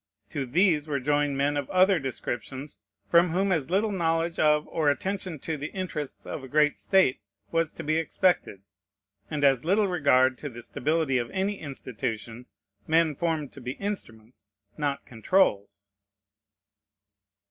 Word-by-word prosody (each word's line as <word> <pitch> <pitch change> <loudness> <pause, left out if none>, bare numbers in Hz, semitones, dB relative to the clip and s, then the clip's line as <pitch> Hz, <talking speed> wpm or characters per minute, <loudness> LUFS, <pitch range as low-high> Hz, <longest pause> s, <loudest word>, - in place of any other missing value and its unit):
To 135 -2 -3
these 160 +1 +2
were 145 -2 -1
joined 145 +1 +1
men 145 +1 +1
of 145 -2 -3
other 185 0 +4
descriptions, 130 -1 -5 0.3
from 170 +1 +4
whom 190 +4 +1
as 160 -6 0
little 205 +4 +1
knowledge 165 -2 0
of 150 0 +3
or 155 -3 +1
attention 185 +2 -2
to 160 -2 -3
the 145 +2 -5
interests 165 -7 -5
of 140 - -6
a - - -8
great 150 +2 +2
state 190 -10 +3 0.3
was 165 -1 +1
to - - -7
be 155 +2 +1
expected, 165 - 0 0.7
and 150 -2 -2
as 135 -3 +4
little 200 +5 +2
regard 130 -7 +3
to 145 - -5
the 120 -1 -10
stability 150 0 0
of 120 -1 -3
any 195 +1 -2
institution, 120 -4 -5 0.4
men 160 -1 +3
formed 155 -1 -2
to 140 - -11
be 125 +1 -4
instruments, 120 - -7 0.3
not 145 -2 -2
controls. 100 - 0
150 Hz, 150 wpm, -27 LUFS, 130-170 Hz, 0.7 s, other